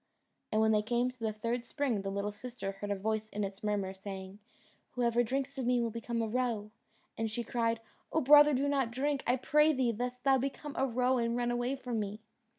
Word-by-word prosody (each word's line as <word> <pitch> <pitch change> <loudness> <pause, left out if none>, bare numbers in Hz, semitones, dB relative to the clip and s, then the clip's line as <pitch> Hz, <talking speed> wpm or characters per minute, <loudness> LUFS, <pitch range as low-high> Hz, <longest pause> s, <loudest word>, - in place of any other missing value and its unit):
And 215 - +2
when 220 0 +4
they 210 -1 +4
came 240 +3 0
to 250 - -26
the 220 -1 -1
third 230 +3 -2
spring, 245 -5 -1
the 195 - -3
little 200 +1 -2
sister 235 -1 -6
heard 195 +1 -7
a 200 - +1
voice 215 +2 -2
in 210 -1 -3
its 195 0 -5
murmur, 205 -2 -1
saying, 190 0 -8 0.5
"Whoever 240 -1 +2
drinks 270 +3 -2
of 250 - -1
me 250 0 +3
will 230 -1 0
become 230 +1 -2
a - - -1
roe," 225 -3 -1 0.5
and 225 0 0
she 235 +2 -2
cried, 230 0 0 0.3
"Oh 320 - +2
brother, 295 +1 +8
do 275 +2 +1
not 275 -4 +1
drink, 275 +3 -1
I 245 - +4
pray 300 +4 +4
thee, 255 -4 +1
lest 245 +2 -4
thou 270 -1 +4
become 275 +2 -4
a 270 - +1
roe 250 +1 +2
and 235 0 0
run 240 0 0
away 245 +2 0
from 250 -4 -3
me." 210 0 -4
235 Hz, 225 wpm, -32 LUFS, 215-255 Hz, 0.5 s, brother